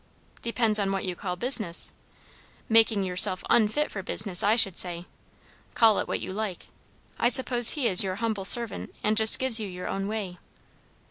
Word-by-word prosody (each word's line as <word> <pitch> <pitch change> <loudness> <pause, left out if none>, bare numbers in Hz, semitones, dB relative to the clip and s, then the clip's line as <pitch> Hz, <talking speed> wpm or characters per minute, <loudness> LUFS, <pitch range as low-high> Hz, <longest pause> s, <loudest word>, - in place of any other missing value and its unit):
"Depends 230 -2 -1
on 195 -1 -3
what 195 0 -5
you 180 -1 -6
call 180 -1 -7
business. 215 -5 +1 0.7
Making 225 -2 +1
yourself 185 0 +2
unfit 235 +7 -1
for 195 - -8
business, 190 -1 +1
I 210 +2 0
should 195 -6 -1
say. 175 -1 -4 0.7
Call 225 -3 +2
it - - -6
what - - -6
you - - -8
like. 205 -3 -8 0.5
I 240 - 0
suppose 245 -2 +5
he 280 -6 -3
is 185 -2 +6
your 190 -1 -6
humble 220 -2 -5
servant, 235 +2 +3
and 215 +1 -2
just 220 0 +5
gives 260 -3 +1
you 215 - -7
your 180 -1 -10
own 195 0 -6
way." 200 -5 -8
210 Hz, 180 wpm, -23 LUFS, 185-230 Hz, 0.7 s, is